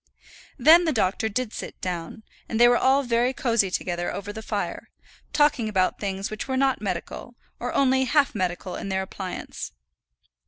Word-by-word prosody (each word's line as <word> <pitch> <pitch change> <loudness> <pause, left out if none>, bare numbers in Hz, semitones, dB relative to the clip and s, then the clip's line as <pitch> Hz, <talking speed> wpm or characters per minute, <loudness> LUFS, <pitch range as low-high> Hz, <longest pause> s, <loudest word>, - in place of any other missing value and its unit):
Then 320 +6 +7
the 320 - +2
doctor 215 -2 0
did 230 +1 -2
sit - - -7
down, 180 +4 -5 0.3
and 225 - -1
they 240 - +8
were 245 - +5
all 270 +3 +3
very 240 +1 +1
cosy 230 -7 +1
together 175 -1 -2
over 205 +1 -6
the 220 - -7
fire, - - -4 0.4
talking 290 -7 +2
about 185 -3 +1
things 195 0 -3
which 215 - -5
were 260 -1 -1
not 270 -4 +2
medical, 205 +5 -5 0.2
or 245 - -3
only 265 -1 +3
half 285 +2 +2
medical 185 -2 -3
in 200 - -5
their 190 0 0
appliance. 185 - -6
220 Hz, 170 wpm, -25 LUFS, 190-260 Hz, 0.4 s, they